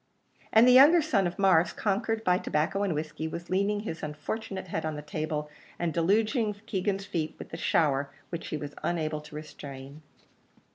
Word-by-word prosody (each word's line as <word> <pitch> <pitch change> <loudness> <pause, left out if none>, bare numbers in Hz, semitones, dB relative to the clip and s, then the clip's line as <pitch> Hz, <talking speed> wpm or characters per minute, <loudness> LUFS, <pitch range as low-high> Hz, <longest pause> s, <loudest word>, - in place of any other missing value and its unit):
And 225 +2 +7
the - - +8
younger 285 +7 +8
son 245 - +2
of 175 - -6
Mars, 180 -4 +4
conquered 220 +2 -1
by 180 -2 +3
tobacco 155 +6 0
and 195 -6 0
whiskey, 155 +1 -3
was 170 +2 -7
leaning 200 +2 +1
his 165 -6 -5
unfortunate 190 +7 -5
head - - -2
on 155 -1 -2
the 150 - -6
table, 150 0 -3 0.3
and 170 -2 -1
deluging 215 - +2
Keegan's 195 -2 -1
feet 160 -5 -3
with - - -9
the - - -6
shower 140 -3 +1 0.2
which 170 -1 -5
he 155 - -3
was 145 -1 -6
unable 155 -3 -1
to 150 0 -12
restrain. 140 -1 -9
170 Hz, 180 wpm, -28 LUFS, 155-205 Hz, 0.3 s, the